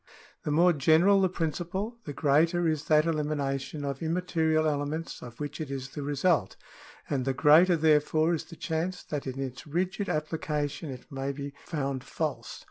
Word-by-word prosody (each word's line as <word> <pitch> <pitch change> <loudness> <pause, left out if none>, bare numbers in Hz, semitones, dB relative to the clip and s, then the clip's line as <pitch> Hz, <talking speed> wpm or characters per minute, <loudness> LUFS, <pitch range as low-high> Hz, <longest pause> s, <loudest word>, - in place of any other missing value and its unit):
The - - -1
more 170 +4 +5
general 165 +7 +4
the 190 - +3
principle, 185 +7 -3
the 145 - -4
greater 165 +5 +3
is 155 -1 -1
that 155 0 +4
elimination 145 -3 -2
of 140 -1 -4
im 160 0 -1
material 160 -3 +1
elements 150 +2 -2
of 120 -1 -10
which 145 +1 -5
it 155 - -4
is 135 -1 -5
the 145 - -6
result, 145 - +1 0.5
and 135 -3 -1
the 135 0 -1
greater 160 +6 +6
therefore 155 +1 +3
is 160 - -2
the 165 - -12
chance 165 +3 -3
that 145 -2 -4
in 130 +1 -4
its 130 0 -5
rigid 185 +6 -1
application 150 -1 -2
it 130 +1 -9
may 135 0 -2
be 140 0 -6
found 135 -5 -2
false. 140 -8 -4
155 Hz, 175 wpm, -28 LUFS, 140-165 Hz, 0.5 s, greater